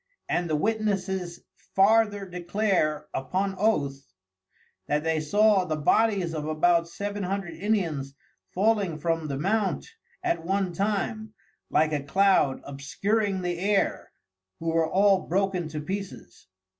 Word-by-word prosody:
And 175 -1 -1
the 155 - +1
Witnesses 190 -2 -1 0.3
farther 205 0 +4
declare 180 -3 0
upon 190 +9 -1
Oath, 145 -10 +1 0.9
that 150 +1 0
they 160 -1 +1
saw 205 +5 +3
the 155 - -1
bodies 185 +2 +2
of 155 -1 -3
about 165 +2 +2
seven 205 +3 -4
hundred 190 -2 -3
Indians 165 -8 -1 0.4
falling 200 -4 +1
from 165 0 -1
the 140 -2 -3
Mount 195 +5 0 0.4
at 345 - 0
one 190 0 0
time, 215 +3 -2 0.3
like 155 0 +2
a 145 - 0
Cloud 165 -2 +2
obscuring 195 +8 -1
the 175 -1 -2
Air, 200 +1 0 0.5
who 165 - -2
were 165 -1 +1
all 195 0 +3
broken 185 -1 0
to 155 -1 -5
pieces. 185 - -7
185 Hz, 130 wpm, -26 LUFS, 155-205 Hz, 0.9 s, farther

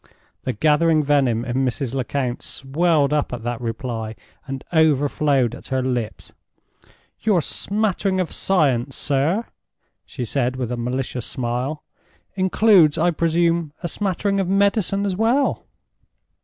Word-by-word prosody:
The 130 - -1
gathering 155 +5 +3
venom 135 -5 +2
in 120 0 -2
Mrs. 135 -1 -1
Lecount 130 -1 -2
swelled 150 +1 +1
up 150 -1 0
at 120 -2 -5
that 120 0 -3
reply, 115 -1 -4 0.3
and 135 -1 -5
overflowed 145 -5 +2
at - - -9
her 130 -1 -1
lips. 125 -4 -3 0.9
"Your 210 -5 +2
smattering 195 +1 0
of 180 - -1
science, 135 -8 +1
sir," 155 +10 0 0.6
she 125 -3 -6
said, 125 +1 -1
with 125 -2 -3
a - - -1
malicious 125 0 -3
smile, 125 +5 -3 0.5
"includes, 190 -4 +4
I 175 +2 +3
presume, 165 -1 +1
a - - 0
smattering 195 +2 -1
of 190 - 0
medicine 200 +1 +2
as 195 -2 -1
well?" 235 +7 +1
145 Hz, 130 wpm, -21 LUFS, 125-175 Hz, 0.9 s, includes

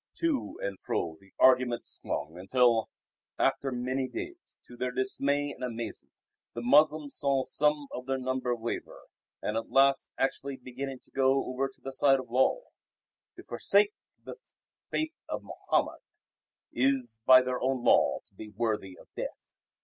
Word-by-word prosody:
To 320 -6 -1
and 100 -1 -3
fro 80 -1 -2
the 100 0 -22
argument 125 -2 +4
swung 80 +5 -4
till, 120 -3 +4 0.5
after 135 - +1
many 130 +2 -1
days, 355 - -8
to 120 - -13
their 125 +1 -2
dismay 140 +3 +1
and - - -9
amazement 115 -2 -5 0.4
the 120 - -4
Moslems 150 +3 +4
saw 140 -2 +2
some 150 +1 +1
of 125 +1 -7
their 135 0 0
number 130 -1 -1
waver 115 0 -5 0.4
and 105 - -1
at 115 0 -3
last 135 0 +4
actually 135 0 -1
beginning 130 +1 -6
to - - -25
go 135 0 +2
over 130 +2 -1
to - - -21
the 135 - -6
side 135 0 +4
of 125 -3 -9
Lull. 130 - +2 0.7
To - - -11
forsake 420 0 +2 0.3
the - - -8 0.5
Faith 315 +1 -1 0.2
of - - -4
Mohammed - - -1 0.7
is 125 -3 +1
by 130 0 +9
their 125 0 -2
own 130 -1 0
law - - +4
to - - -15
be 105 +2 -9
worthy 105 -3 -2
of - - -16
death. - - -4
130 Hz, 155 wpm, -29 LUFS, 120-140 Hz, 0.7 s, by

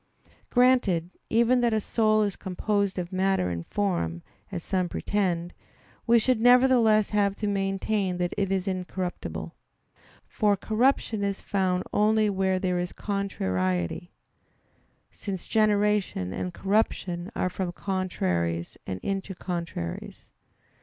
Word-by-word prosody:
Granted 240 -9 +3 0.2
even 235 +2 +3
that 240 - +3
the 220 -1 +1
soul 215 0 +2
is 200 -2 -1
composed 200 +1 -1
of 175 -1 -3
matter 190 - +1
and 85 -1 -5
form, 130 - -1 0.3
as 175 -3 -4
some 185 -2 0
pretend, 175 -4 -1 0.5
we 235 0 +6
should 235 0 +2
nevertheless 245 -4 +5
have 200 -2 +2
to 210 - -4
maintain 195 -1 0
that 175 0 -1
it 195 -2 -1
is 190 0 0
incorruptible. 185 -1 -4 0.7
For 205 -2 +1
corruption 220 0 +1
is 200 -1 -1
found 185 -2 0
only 215 0 +3
where 190 -1 +1
there 180 -1 0
is 180 0 -3
contrariety; 95 - -2 1.0
since 190 -4 -6
generation 210 - +1
and 180 - -3
corruption 190 -2 -1
are 185 - 0
from 180 -1 -3
contraries 90 - -2
and 95 -1 -3
into 195 -1 -3
contraries. 170 - -5
195 Hz, 125 wpm, -27 LUFS, 175-210 Hz, 1.0 s, we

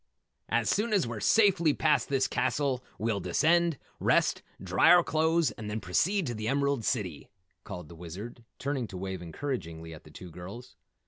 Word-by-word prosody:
"As 115 -1 +1
soon 215 +2 +1
as 195 -9 +3
we're 115 -2 -5
safely 175 - +4
past 155 - +2
this 135 -1 +2
castle, 130 0 0
we'll 110 -2 -1
descend, 170 +3 +2 0.2
rest, - - +2 0.2
dry 95 -1 +3
our 175 -1 +8
clothes 160 +2 +2
and 110 -3 -7
then 105 +1 -2
proceed 180 - +1
to 120 - -2
the 110 -1 -4
Emerald 140 -1 +1
City," 95 - -2 0.3
called 90 -3 -8
the 85 - -12
Wizard, 90 +8 -9
turning 135 -4 -2
to 95 - -8
wave 95 -1 -5
encouragingly 85 - -5
at 80 - -12
the - - -15
two 90 +3 -11
girls. 95 +9 -10
120 Hz, 175 wpm, -29 LUFS, 95-150 Hz, 0.3 s, our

